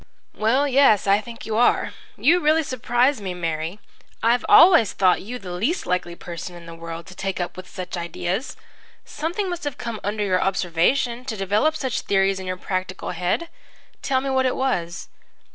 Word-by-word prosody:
"Well, 255 +7 +2
yes, 270 -6 +4
I 200 +1 +4
think 235 0 -10
you 220 -1 -2
are. 240 - +3 0.3
You 340 +5 +4
really 315 0 +3
surprise 255 0 +1
me, 185 -2 -4
Mary. 165 +2 -3 0.4
I 230 +1 +5
always 335 - +7
thought 185 -2 +3
you 240 +6 -6
the 190 -6 -8
least 225 - -1
likely 180 -1 -1
person 175 +1 -7
in 170 -1 -11
the 165 - -9
world 165 0 -8
to 185 - -12
take 195 0 -3
up 175 - -3
with 185 0 -10
such 185 -1 -6
ideas. 175 - -3 0.5
Something 395 -3 -3
must 350 -2 -4
have 290 -2 -4
come 230 -2 -5
under 210 +1 -1
your 185 -2 +1
observation 195 +7 +1
to 225 -5 -4
develop 205 +11 +1
such 260 -6 -2
theories 195 -1 +1
in 190 - -7
your 185 0 -3
practical 185 0 -4
head. 180 - -1 0.5
Tell 260 -2 +1
me 270 0 -2
what 260 0 +2
it 255 - -1
was." 180 -9 -2
205 Hz, 185 wpm, -23 LUFS, 180-260 Hz, 0.5 s, always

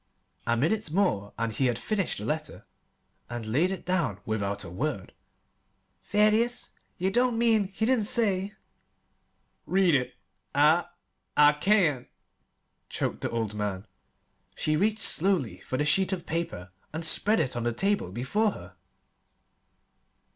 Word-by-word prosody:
A 120 0 +2
minute 175 - +1
more, 155 - +1
and 115 -1 -2
he 130 +4 +1
had 120 -2 0
finished 200 - -2
the 105 - -5
letter 155 +5 -4 0.6
and 120 -1 -5
laid 140 +12 +2
it 190 -1 -5
down 165 - 0
without 100 -2 -2
a - - -8
word. 125 +1 -3 0.9
"Thaddeus, 215 +4 +2 0.3
ye 190 +2 0
don't 245 +2 +2
mean 225 -3 +3
he 200 +3 -2
didn't 240 -3 +2
say 205 -3 +1 0.5
" - - -46
"Read 185 -4 +4
it 130 -3 0 0.4
I 150 +4 +4 0.5
I 150 0 +8
can't," 155 - +2 0.8
choked - - -3
the - - -1
old 115 -2 -2
man. 105 -2 -3 0.7
She 155 - 0
reached 210 +5 +1
slowly 180 - +1
for 130 - -4
the 150 - 0
sheet 190 +5 +2
of 185 -3 -3
paper 130 - -4 0.2
and 160 +2 -2
spread 210 +6 +3
it 135 -6 -1
on 120 - -2
the 120 +1 0
table 195 - 0
before 195 - 0
her. - - -12
160 Hz, 145 wpm, -27 LUFS, -, 0.9 s, I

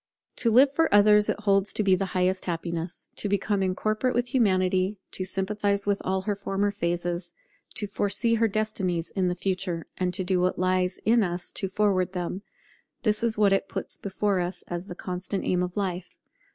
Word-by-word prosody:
To 235 - +2
live 260 +5 +6
for 325 +3 +2
others 210 0 +6
it - - -1
holds 195 -1 +2
to 215 - 0
be 195 -2 +4
the 185 +1 +1
highest 185 +1 +1
happiness. 170 0 -4
To 205 - -2
become 200 0 0
incorporate 215 +6 0
with 245 0 0
Humanity, 185 -4 +2
to 185 - -2
sympathize 200 +2 -1
with 205 -1 0
all 190 0 0
her 205 +1 -1
former 200 +1 -1
phases, 175 -2 -2 0.4
to 210 - -1
foresee 205 +3 0
her 225 0 +3
destinies 195 -5 -1
in 190 -2 0
the 180 - 0
future, 180 -2 -2
and 180 -1 +1
to 190 - +1
do 180 0 +1
what 180 0 +1
lies 185 0 +1
in 230 +1 +4
us 175 -2 -2
to 195 - -3
forward 190 -2 +1
them; 180 +1 -3 0.6
this 215 0 +1
is 230 -2 +1
what 205 -2 +4
it 195 - 0
puts - - -5
before 200 0 0
us 175 0 -2
as 175 +2 -5
the 180 - -7
constant 185 +2 -3
aim 180 -1 +1
of 180 +1 -3
life. 185 -3 -3
195 Hz, 190 wpm, -26 LUFS, 180-210 Hz, 0.6 s, live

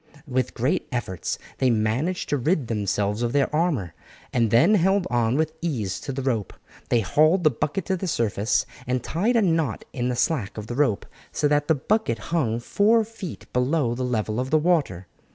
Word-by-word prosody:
With 130 -2 -1
great 140 +10 0
efforts 105 - -3 0.2
they 130 - +3
managed 120 +11 0
to 145 - +1
rid 150 +2 +1
themselves 105 0 -1
of 120 -1 -1
their 145 +1 +1
armour, 150 - 0 0.4
and 115 -2 +2
then 155 - +5
held 190 0 +3
on 120 0 +2
with 155 0 0
ease 120 - -2
to - - -5
the 135 0 -4
rope. 115 -7 -1 0.4
They 120 - +3
hauled 155 - +3
the 155 - +5
bucket 155 +8 -2
to 190 - 0
the 190 - -4
surface 110 - 0 0.2
and 125 -1 -1
tied 205 - 0
a 230 - +4
knot 160 - 0
in 125 0 -1
the 125 - -1
slack 120 -7 -1
of 105 - -5
the 120 - -5
rope, 130 -7 +1 0.3
so 150 - +1
that 145 0 +2
the 160 - +4
bucket 200 - 0 0.2
hung 120 -9 +1
four 215 - +3
feet 215 -5 -8
below 125 0 +1
the 125 - -5
level 110 -3 -1
of 130 +1 -2
the 155 - +4
water. 150 - +1
130 Hz, 195 wpm, -24 LUFS, 115-165 Hz, 0.4 s, then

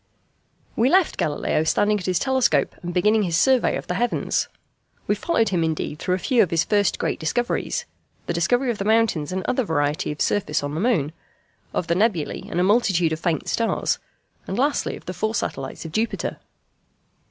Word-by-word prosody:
We 235 +3 +3
left 370 +2 +3
Galileo 155 +1 0
standing 205 +6 +2
at 180 - -6
his 180 -2 +2
telescope 260 0 +2
and 175 - -4
beginning 210 +5 +3
his 170 -5 0
survey 260 +2 +3
of - - -7
the - - -2
heavens. 240 +1 0 0.6
We - - +2
followed 225 -10 +1
him 175 -4 +1
indeed 155 -1 -2
through 180 0 0
a - - -2
few 240 +5 +2
of 190 - +2
his 165 -1 +2
first 205 -3 +1
great - - -2
discoveries 240 +10 -1 0.4
the - - -2
discovery 245 +10 +1
of 220 - -6
the - - -1
mountains 215 -8 +2
and 185 0 -2
other 255 +1 0
variety 150 -6 0
of 150 - -7
surface 185 -8 0
in 145 0 -3
the 155 - -2
moon, 190 - +1 0.6
of - - -1
the 170 - +1
nebulæ 185 -5 0
and 175 - -2
a - - +3
multitude 190 -6 +3
of 160 - -4
faint 165 -2 -1
stars, 230 -1 0 0.5
and 190 - -3
lastly 280 +3 0
of - - -16
the 185 - -4
four 220 +4 -2
satellites 135 -4 -4
of 165 - -6
Jupiter. 220 +7 -2
190 Hz, 195 wpm, -23 LUFS, 165-230 Hz, 0.6 s, We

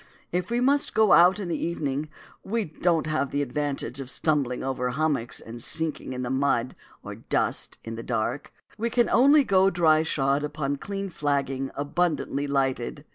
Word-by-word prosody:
If 180 0 -2
we 235 +1 0
must 280 +3 +2
go 220 -2 +4
out 180 +4 +6
in 195 - -4
the 170 - -2
evening, 150 -3 -2 0.3
we 225 +1 -1
don't 165 +1 0
have 155 -3 -1
the 145 +1 -1
advantage 140 0 -3
of 130 - -7
stumbling 140 -5 0
over 130 -1 -2
hummocks 140 -4 -1
and 115 +1 -9
sinking 160 -2 -1
in 125 0 -4
the 125 - -3
mud 130 -3 0 0.3
or - - -7
dust - - -2
in 115 - -6
the 115 - -6
dark; 115 +3 -3 0.3
we 230 +2 0
can 240 0 +2
only 280 +4 +6
go 190 -4 +4
dry 160 -4 +3
shod 140 -2 0
upon 145 -1 -2
clean 195 +4 -5
flagging 140 -4 -1
abundantly 145 -1 -1
lighted. 135 0 -1
145 Hz, 175 wpm, -26 LUFS, 135-175 Hz, 0.3 s, out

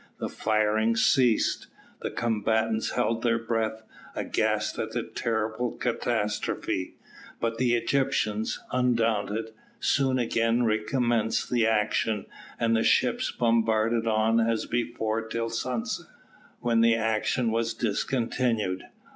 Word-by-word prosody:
The - - -3
firing 110 +1 +1
ceased 115 0 +3 0.3
the - - -2
combatants 110 0 0
held 115 -2 0
their 115 -1 +2
breath, 110 -1 -2 0.3
aghast - - -1
at - - -3
the - - -1
dreadful 115 +1 -2
catastrophe; 105 -5 -2 0.4
but 115 0 -2
the 120 -2 +3
Egyptians, 115 -4 0
undaunted, 115 -3 0 0.3
soon 135 -2 +2
again 115 0 +1
recommenced 115 +1 0
the 120 -2 +3
action, 110 -1 +1 0.3
and 115 0 +2
the 110 - +2
ships - - +2
bombarded 115 -1 +1
on 110 +1 +3
as 115 0 +1
before 115 -2 -1
till 115 0 -3
sunset, 115 0 -3 0.5
when 115 -1 +2
the 115 0 +5
action 115 +1 0
was 115 0 -1
discontinued. 115 -3 -1
115 Hz, 115 wpm, -27 LUFS, 110-120 Hz, 0.5 s, the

